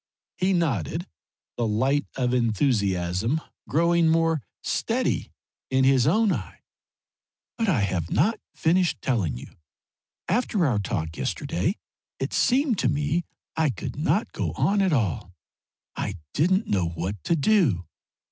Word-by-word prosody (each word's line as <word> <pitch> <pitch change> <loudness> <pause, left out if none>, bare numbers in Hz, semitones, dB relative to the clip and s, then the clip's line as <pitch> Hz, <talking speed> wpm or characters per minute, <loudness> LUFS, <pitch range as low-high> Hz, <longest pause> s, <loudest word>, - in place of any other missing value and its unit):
He 185 +1 +1
nodded, 135 - 0 0.5
the 120 - 0
light 130 +7 +1
of 125 -2 0
enthusiasm 110 - +1 0.3
growing 170 +2 +3
more 165 -2 +2 0.2
steady - - -1 0.4
in 130 0 +2
his 130 -1 +4
own 215 +6 +3
eye. - - -6 0.9
"But 225 -3 0
I 140 - +2
have 90 -4 -1
not 215 - +2 0.2
finished 175 +2 +2
telling 95 - 0
you. - - -11 0.7
After 205 -3 +1
our 120 -8 +2
talk 80 -4 -3
yesterday - - -1 0.4
it 135 - -3
seemed 255 -3 +2
to 125 - +2
me 150 +4 0 0.3
I 160 -2 +2
could 125 - -5
not 155 +8 0
go - - -3
on 200 0 +2
at 190 -2 +2
all. 95 - -1 0.6
I 100 - -3 0.2
didn't 185 +7 +2
know 90 -4 0
what 90 +5 -4
to 170 - +2
do. 150 - +2
140 Hz, 135 wpm, -25 LUFS, 105-170 Hz, 0.9 s, his